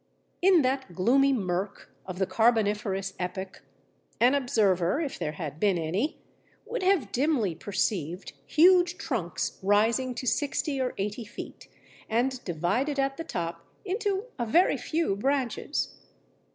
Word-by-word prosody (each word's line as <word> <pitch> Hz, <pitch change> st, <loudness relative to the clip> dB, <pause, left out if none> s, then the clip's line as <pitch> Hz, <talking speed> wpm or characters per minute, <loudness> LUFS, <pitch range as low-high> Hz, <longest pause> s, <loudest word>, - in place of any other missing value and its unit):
In 360 Hz, -4 st, +5 dB
that 260 Hz, -8 st, -1 dB
gloomy 270 Hz, +9 st, +4 dB
mirk 195 Hz, -5 st, -2 dB, 0.2 s
of 185 Hz, -1 st, -6 dB
the 190 Hz, -, +1 dB
Carboniferous 210 Hz, -4 st, +1 dB
epoch, 190 Hz, +1 st, -5 dB, 0.6 s
an 245 Hz, +3 st, +5 dB
observer 210 Hz, -, +2 dB
(if 300 Hz, -5 st, -3 dB
there 150 Hz, -, -2 dB
had 150 Hz, -1 st, -6 dB
been 200 Hz, -2 st, +3 dB
any) 180 Hz, -, -1 dB, 0.5 s
would 475 Hz, +2 st, -4 dB
have 370 Hz, -6 st, +2 dB
dimly 255 Hz, -, +1 dB
perceived 180 Hz, -1 st, -2 dB
huge 355 Hz, +2 st, +5 dB
trunks 230 Hz, -, -3 dB
rising 225 Hz, +6 st, +2 dB
to 255 Hz, -, -5 dB
sixty 280 Hz, +1 st, 0 dB
or 255 Hz, -, -2 dB
eighty 205 Hz, +4 st, -3 dB
feet 220 Hz, -, -9 dB, 0.4 s
and 250 Hz, +3 st, 0 dB
divided 195 Hz, -, -1 dB
at 275 Hz, 0 st, 0 dB
the 330 Hz, -, -4 dB
top 170 Hz, -, -4 dB, 0.2 s
into 400 Hz, +1 st, -1 dB
a 240 Hz, -, 0 dB
very 340 Hz, +11 st, +4 dB
few 320 Hz, -10 st, -1 dB
branches. 260 Hz, +2 st, -1 dB
235 Hz, 135 wpm, -28 LUFS, 190-280 Hz, 0.6 s, In